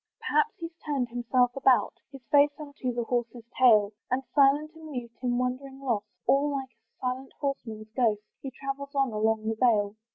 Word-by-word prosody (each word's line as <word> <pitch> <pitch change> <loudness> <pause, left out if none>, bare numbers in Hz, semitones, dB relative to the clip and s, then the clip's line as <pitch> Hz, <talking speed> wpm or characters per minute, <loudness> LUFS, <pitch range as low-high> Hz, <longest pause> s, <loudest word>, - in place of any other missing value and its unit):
Perhaps 450 - +1
he's 330 0 -7
turned 275 -5 -1
himself 245 +1 +2
about, 265 -2 +3 0.2
His 270 -2 -12
face 290 0 +6
unto 285 -4 -4
his 240 -1 -2
horse's 240 -1 -2 0.2
tail, 215 -5 +6 0.2
And 255 +2 0
still 280 -2 +6
and 305 +1 -6
mute, 290 -7 -7
in 245 -1 0
wonder 255 +2 -2
lost, 255 -6 -3 0.2
All 280 +2 +3
like 270 -2 -3
a 225 0 -45
silent 255 +1 -3
horseman 230 -6 -4
ghost, 220 -5 +2 0.2
He 270 - -5
travels 275 +2 -6
on 270 -3 +2
along 220 0 0
the 225 - +1
vale. 210 -5 +3
255 Hz, 180 wpm, -28 LUFS, 235-275 Hz, 0.2 s, face